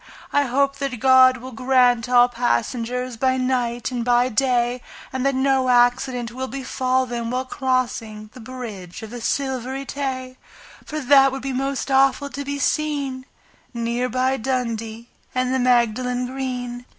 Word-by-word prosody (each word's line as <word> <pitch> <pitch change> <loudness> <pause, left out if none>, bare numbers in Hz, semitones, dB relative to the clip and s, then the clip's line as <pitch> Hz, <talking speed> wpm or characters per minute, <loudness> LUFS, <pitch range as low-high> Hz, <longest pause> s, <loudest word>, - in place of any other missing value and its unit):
I 285 0 +3
hope 275 +2 +1
that 275 -4 -3
God 260 0 +6
will 255 +1 -9
protect 245 -1 +2
all 245 -1 +6
passengers 245 - -2
By 260 +2 +1
night 245 -2 -1
and 245 -2 -2
by 245 +1 +3
day, 245 0 +1 0.3
And 260 -1 -2
that 275 - +1
no 265 -1 +2
accident 245 0 +2
will 260 +2 -4
befall 260 -1 -1
them 235 -2 -4
while 255 +2 -2
crossing 240 -5 -2
The - - -12
Bridge 225 -7 -8
of 220 - -8
the 245 -1 -7
Silvery 265 +1 -2
Tay, 260 -2 -4 0.5
For 310 - -5
that 270 0 +5
would 270 -1 -6
be 270 -1 -3
most 270 +1 -2
awful 275 +1 +3
to 280 +2 -5
be 285 0 -4
seen 280 -3 -1 0.5
Near 235 +2 -1
by 255 +2 +1
Dundee 230 -2 -3 0.3
and 255 0 0
the 260 - +1
Magdalen 250 0 +1
Green. 250 -2 -5
255 Hz, 155 wpm, -22 LUFS, 245-265 Hz, 0.5 s, God